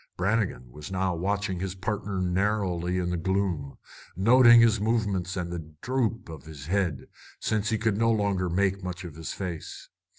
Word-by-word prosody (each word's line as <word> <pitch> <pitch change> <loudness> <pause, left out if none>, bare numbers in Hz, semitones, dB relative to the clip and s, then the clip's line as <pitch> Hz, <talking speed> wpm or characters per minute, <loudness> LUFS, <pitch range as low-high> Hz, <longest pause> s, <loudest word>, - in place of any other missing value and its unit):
Brannigan 95 - -1
was 75 +5 -9
now 95 -1 0
watching 95 +1 -1
his 95 0 -3
partner 100 0 -3
narrowly 90 -1 0
in 90 -1 -1
the 90 - -1
gloom, 90 -6 -1 0.4
noting 120 +4 +7
his 115 -2 +5
movements 100 -5 0
and 85 -1 -3
the 80 -3 -7
droop 120 -3 -1
of 80 -4 -10
his 75 -3 -10
head, 90 -4 -1 0.3
since 110 -1 0
he 110 - +1
could 110 -2 0
no 115 0 +3
longer 100 -4 0
make 95 +2 0
much 90 0 -5
of 85 -4 -8
his 80 +1 -6
face. 90 -5 -6
95 Hz, 170 wpm, -27 LUFS, 85-105 Hz, 0.4 s, noting